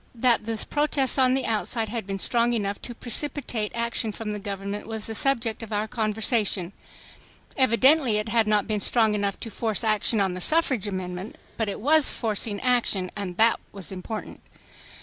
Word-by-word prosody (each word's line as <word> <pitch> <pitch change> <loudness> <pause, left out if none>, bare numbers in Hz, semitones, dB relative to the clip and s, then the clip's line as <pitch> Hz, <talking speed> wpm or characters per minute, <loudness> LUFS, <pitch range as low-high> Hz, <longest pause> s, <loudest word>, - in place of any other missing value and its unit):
That 235 -2 +2
the 225 -1 -1
protest 290 -3 +1
on 255 0 +4
the 265 - -1
outside 225 +1 -1
had 225 -3 -4
been 195 0 -3
strong 235 +4 +2
enough 205 -3 -2
to 240 - -7
precipitate 245 -3 -1
action 235 -1 -1
from 210 +1 -5
the 210 - -4
government 200 0 -5
was 220 -1 -4
the 225 - -4
subject 235 -2 0
of 225 -1 -8
our 210 +1 -1
conversation. 215 -4 0 0.8
Evidently 260 -1 +4
it 210 +1 -2
had 225 -1 +2
not 210 -1 +2
been 215 -2 -1
strong 220 0 +3
enough 200 -1 -1
to 225 - -6
force 220 -2 -1
action 215 0 +2
on 190 -2 +1
the 180 - -6
suffrage 265 - +1
amendment, 185 0 -5 0.2
but 225 -2 -1
it - - -4
was 300 +5 +4
forcing 215 -2 -1
action, 235 -7 +1
and 190 -4 -5
that 225 +1 +4
was 195 -3 -5
important. 195 +4 -6
Mr. - - -22
220 Hz, 185 wpm, -25 LUFS, 205-240 Hz, 0.8 s, on